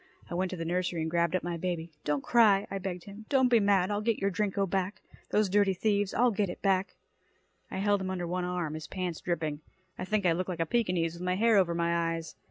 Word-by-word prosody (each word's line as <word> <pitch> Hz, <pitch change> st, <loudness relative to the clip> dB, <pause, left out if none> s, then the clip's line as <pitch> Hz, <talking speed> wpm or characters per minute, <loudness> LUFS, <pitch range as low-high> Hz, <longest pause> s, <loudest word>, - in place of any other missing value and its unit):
I -, -, -3 dB
went 185 Hz, +2 st, 0 dB
to 185 Hz, -, -5 dB
the 165 Hz, -, -4 dB
nursery 175 Hz, 0 st, -1 dB
and 160 Hz, -, -3 dB
grabbed 170 Hz, 0 st, +1 dB
up 185 Hz, -, -1 dB
my 175 Hz, 0 st, -3 dB
baby. 170 Hz, -1 st, -3 dB
"Don't 145 Hz, -2 st, 0 dB
cry," 210 Hz, -5 st, +4 dB
I 195 Hz, -, -2 dB
begged 180 Hz, -2 st, -5 dB
him. 205 Hz, +2 st, -11 dB
"Don't 260 Hz, -2 st, +4 dB
be 235 Hz, -2 st, +5 dB
mad. 200 Hz, -2 st, +3 dB
I'll 205 Hz, 0 st, 0 dB
get 225 Hz, 0 st, +1 dB
your 200 Hz, 0 st, 0 dB
Drinko 200 Hz, 0 st, 0 dB
back. 190 Hz, +2 st, -2 dB, 0.3 s
Those 210 Hz, 0 st, +2 dB
dirty 195 Hz, 0 st, +3 dB
thieves, 205 Hz, 0 st, +1 dB
I'll 245 Hz, +1 st, +3 dB
get 200 Hz, -2 st, 0 dB
it 175 Hz, -, -6 dB
back." 195 Hz, 0 st, +1 dB, 0.7 s
I -, -, -5 dB
held 200 Hz, 0 st, +2 dB
him 190 Hz, -, -3 dB
under 180 Hz, -2 st, -2 dB
one 180 Hz, +1 st, -2 dB
arm, 180 Hz, -3 st, -2 dB
his 155 Hz, 0 st, -6 dB
pants 180 Hz, -3 st, -4 dB
dripping. 155 Hz, -4 st, -2 dB, 0.4 s
I 185 Hz, -, -3 dB
think 210 Hz, 0 st, 0 dB
I 175 Hz, -, +5 dB
looked 185 Hz, +3 st, -1 dB
like 175 Hz, -3 st, -4 dB
a 165 Hz, -, +1 dB
Pekinese, 180 Hz, -5 st, 0 dB
with 170 Hz, -, -10 dB
my 180 Hz, 0 st, 0 dB
hair 225 Hz, +3 st, +4 dB
over 180 Hz, -4 st, +3 dB
my 170 Hz, 0 st, +1 dB
eyes. 165 Hz, -1 st, -7 dB
185 Hz, 250 wpm, -30 LUFS, 170-200 Hz, 0.7 s, be